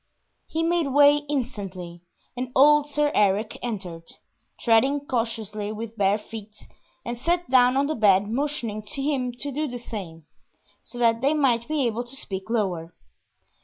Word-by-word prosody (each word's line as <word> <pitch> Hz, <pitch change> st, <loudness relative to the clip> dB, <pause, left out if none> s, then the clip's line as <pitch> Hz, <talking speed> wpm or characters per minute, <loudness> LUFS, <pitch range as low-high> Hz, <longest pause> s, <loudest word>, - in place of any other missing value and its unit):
He 325 Hz, +1 st, -2 dB
made 335 Hz, -2 st, +1 dB
way 285 Hz, +1 st, +6 dB
instantly, 195 Hz, -11 st, -4 dB, 0.3 s
and 250 Hz, 0 st, -4 dB
old 295 Hz, +2 st, +6 dB
Sir 295 Hz, 0 st, +1 dB
Eric 210 Hz, +1 st, +1 dB
entered, 185 Hz, -8 st, -6 dB, 0.5 s
treading 265 Hz, +5 st, +3 dB
cautiously 220 Hz, -4 st, -2 dB
with 220 Hz, +1 st, -6 dB
bare 200 Hz, -1 st, +2 dB
feet, 215 Hz, 0 st, -10 dB, 0.4 s
and 235 Hz, 0 st, -4 dB
sat 345 Hz, +5 st, 0 dB
down 255 Hz, 0 st, +5 dB
on 275 Hz, -, +3 dB
the 305 Hz, -, -1 dB
bed 205 Hz, -5 st, +4 dB
motioning 240 Hz, -3 st, -2 dB
him 270 Hz, +3 st, -2 dB
to 280 Hz, +4 st, -5 dB
do 300 Hz, +3 st, -2 dB
the 245 Hz, -2 st, -5 dB
same, 185 Hz, -9 st, -8 dB, 0.6 s
so 245 Hz, -, -12 dB
that 230 Hz, -1 st, +2 dB
they 280 Hz, +4 st, +2 dB
might 245 Hz, -6 st, +2 dB
be 300 Hz, -4 st, 0 dB
able 235 Hz, +1 st, -1 dB
to 245 Hz, +2 st, -10 dB
speak 195 Hz, -6 st, -6 dB
lower. 180 Hz, -7 st, -2 dB
235 Hz, 155 wpm, -25 LUFS, 210-280 Hz, 0.6 s, way